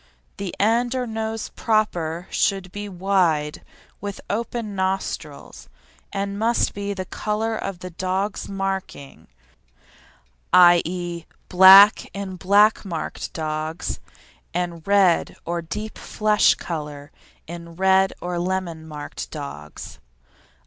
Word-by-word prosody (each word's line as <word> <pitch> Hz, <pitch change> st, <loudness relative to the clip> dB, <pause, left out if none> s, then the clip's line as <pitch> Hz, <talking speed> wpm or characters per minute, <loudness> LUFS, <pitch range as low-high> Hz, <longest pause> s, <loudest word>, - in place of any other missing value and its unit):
The 200 Hz, -3 st, -5 dB
end 235 Hz, +4 st, +2 dB
or 255 Hz, -1 st, -1 dB
nose 220 Hz, -1 st, -4 dB
proper 180 Hz, -6 st, -1 dB
should 195 Hz, -3 st, 0 dB
be 205 Hz, +1 st, -6 dB
wide, 175 Hz, -5 st, 0 dB, 0.4 s
with 200 Hz, 0 st, -5 dB
open 230 Hz, 0 st, -3 dB
nostrils, 190 Hz, -6 st, -4 dB, 0.4 s
and 200 Hz, 0 st, -3 dB
must 230 Hz, +2 st, +1 dB
be 200 Hz, 0 st, -4 dB
the 185 Hz, -1 st, -4 dB
colour 220 Hz, +4 st, -2 dB
of 195 Hz, -4 st, -5 dB
the 180 Hz, -, -7 dB
dog's 190 Hz, +4 st, -2 dB
marking, 190 Hz, -, -5 dB, 1.3 s
i.e., 175 Hz, -1 st, +4 dB, 0.2 s
black 190 Hz, +3 st, +8 dB
in 195 Hz, -2 st, -5 dB
black 200 Hz, +4 st, +4 dB
marked 170 Hz, -6 st, -5 dB
dogs, 155 Hz, +1 st, -3 dB, 0.6 s
and 175 Hz, -2 st, -3 dB
red 195 Hz, -4 st, +3 dB
or 170 Hz, 0 st, -2 dB
deep 210 Hz, +6 st, -6 dB
flesh 210 Hz, -1 st, +3 dB
colour 150 Hz, -3 st, -6 dB, 0.3 s
in 170 Hz, 0 st, -9 dB
red 190 Hz, +1 st, +3 dB
or 175 Hz, 0 st, -3 dB
lemon 175 Hz, -3 st, -3 dB
marked 150 Hz, -2 st, -7 dB
dogs. 140 Hz, -, -8 dB
190 Hz, 110 wpm, -23 LUFS, 170-205 Hz, 1.3 s, black